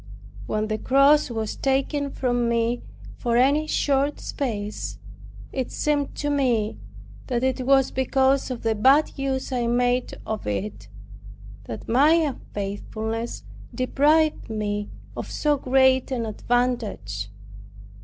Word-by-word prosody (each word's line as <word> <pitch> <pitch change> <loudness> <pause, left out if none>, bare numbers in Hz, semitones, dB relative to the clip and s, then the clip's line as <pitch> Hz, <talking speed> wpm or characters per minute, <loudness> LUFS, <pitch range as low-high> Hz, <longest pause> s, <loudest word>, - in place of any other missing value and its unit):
When 215 0 -1
the 215 0 -2
cross 275 +3 +4
was 220 -2 -3
taken 275 +1 0
from 245 -3 0
me 235 +1 +1 0.4
for 235 -1 0
any 285 +5 +3
short 285 -1 +1
space, 215 -6 -4 0.5
it 260 -2 -2
seemed 290 -2 -1
to 290 0 -2
me 240 - +1 0.5
that 245 0 -1
it 260 -1 0
was 270 -1 +4
because 265 +1 +2
of 250 -2 -5
the 225 -1 +2
bad 270 +8 +4
use 270 -1 -2
I 245 -2 0
made 245 +1 +1
of 215 - -4
it; 105 0 -3 0.8
that 115 - -7
my 280 +7 +5
unfaithfulness 225 -6 -3 0.3
deprived 300 +4 +2
me 205 -1 -2 0.3
of - - -5
so 300 -1 +1
great 260 0 +3
an 245 -4 -2
advantage. 215 - -1
250 Hz, 125 wpm, -24 LUFS, 220-275 Hz, 0.8 s, my